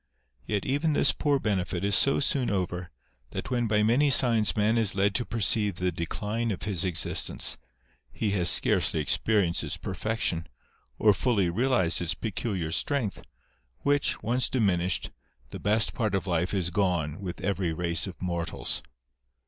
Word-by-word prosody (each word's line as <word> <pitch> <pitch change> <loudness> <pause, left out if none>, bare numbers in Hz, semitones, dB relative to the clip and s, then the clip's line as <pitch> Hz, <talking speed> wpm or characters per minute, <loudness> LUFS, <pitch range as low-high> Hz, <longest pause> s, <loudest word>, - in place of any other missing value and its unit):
Yet 105 -2 -1
even 145 +4 0
this 145 - +4
poor 145 -2 0
benefit 95 -6 -2
is 100 0 0
so 140 - +4
soon 135 -2 +1
over, 90 -2 -3 0.4
that - - -5
when 120 -2 0
by 105 -1 +2
many 125 +7 +3
signs 115 -8 +4
man 105 +2 +2
is 110 -5 +2
led 100 +1 +2
to 120 - -1
perceive 105 -3 +1
the 90 0 -1
decline 105 +8 -3
of 100 - -4
his 100 -3 -1
existence, 85 -7 +1 0.5
he 105 -3 -2
has 90 -3 +2
scarcely - - +3
experienced 90 +4 +1
its - - -3
perfection, 110 -7 -2 0.5
or 105 -1 +4
fully 100 -5 +1
realised 115 -5 +2
its 85 0 -1
peculiar 100 -6 -3
strength, 115 - -1 0.6
which, 145 -4 +1
once 125 +3 +1
diminished, 95 -7 0 0.4
the - - -7
best 105 +2 +1
part 110 -5 -1
of 95 - -2
life 90 -1 -1
is 90 -4 -1
gone 85 -5 -1
with 90 -3 -6
every 95 -4 -1
race 85 +2 -2
of 95 - -9
mortals. 85 -2 -2
100 Hz, 155 wpm, -27 LUFS, 90-115 Hz, 0.6 s, this